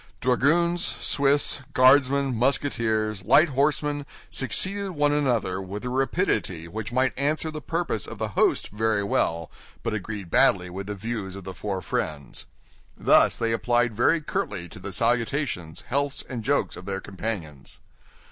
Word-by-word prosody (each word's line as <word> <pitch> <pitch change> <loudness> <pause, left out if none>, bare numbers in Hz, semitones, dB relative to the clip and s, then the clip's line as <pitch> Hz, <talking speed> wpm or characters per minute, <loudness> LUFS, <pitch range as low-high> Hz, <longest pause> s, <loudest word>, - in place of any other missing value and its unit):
Dragoons, 170 +8 +2 0.2
Swiss, 140 +1 +2
Guardsmen, 135 +1 +4
Musketeers, 110 -5 0
light 155 - +5
horsemen, 145 +1 0 0.2
succeeded 190 +8 0
one 145 -2 +2
another 120 -10 0
with 100 +5 -7
a - - -2
rapidity 130 - -1
which 105 +5 -6
might 130 -1 +1
answer 155 +3 0
the 155 0 -6
purpose 160 - -2
of 115 - -8
the 110 0 -3
host 100 - +1
very 110 0 0
well, 85 -4 -1 0.3
but 115 - -2
agreed 105 -3 -5
badly 90 -2 +4
with 95 +2 -6
the 105 - -4
views 100 -2 -5
of 100 - -8
the 95 +1 -7
four 95 -2 -4
friends. 70 -3 -4 0.5
Thus - - +4
they 115 -1 0
applied 120 +1 +1
very 160 +9 +3
curtly 100 - -3
to - - -12
the 100 - -7
salutations, 115 - -1
healths, 140 +1 -2
and 120 -4 -5
jokes 140 +5 0
of 90 - -11
their 95 -1 -2
companions. 95 -9 -5
115 Hz, 150 wpm, -25 LUFS, 100-140 Hz, 0.5 s, light